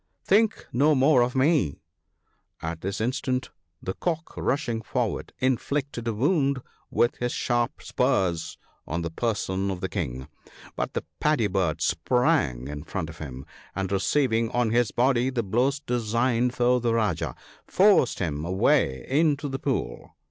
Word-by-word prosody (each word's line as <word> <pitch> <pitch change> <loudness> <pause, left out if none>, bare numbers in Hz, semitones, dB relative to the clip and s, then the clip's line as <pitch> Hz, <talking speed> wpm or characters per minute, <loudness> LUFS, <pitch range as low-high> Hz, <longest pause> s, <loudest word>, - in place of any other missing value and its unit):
"Think 215 +2 +3
no 145 +5 +4
more 135 0 +5
of 125 +1 0
me." 135 - +2 0.8
At 80 0 -5
this 100 +1 -3
instant 125 +2 -1 0.3
the 95 - -2
Cock 165 - -3
rushing 125 -6 -1
forward, - - -2
inflicted 130 -1 -1
a 115 - 0
wound 140 - +1 0.3
with 120 - +1
his 120 0 -1
sharp 120 +3 -1
spurs 95 -11 0 0.3
on 85 +2 -2
the 85 - -3
person 100 -1 -1
of 95 -2 -3
the 95 - -2
King; 65 - -4 0.5
but - - -3
the - - -2 0.2
Paddy 150 -7 +2
bird 90 -6 0
sprang 90 - +1
in 75 0 -6
front 80 -1 -4
of 80 - -15
him, 65 -3 -7 0.3
and 95 0 -2
receiving 115 +3 +1
on 120 -2 +1
his 120 -1 +3
body 125 +2 +2
the 125 -3 -1
blows 125 +8 +1
designed 120 0 0
for 125 0 +3
the 115 -1 +1
Rajah, 105 -8 0 0.3
forced 190 - +4
him 75 -4 -2
away 85 -7 +2
into 145 +1 +2
the 135 -1 -4
pool. - - -3
120 Hz, 150 wpm, -26 LUFS, 95-135 Hz, 0.8 s, more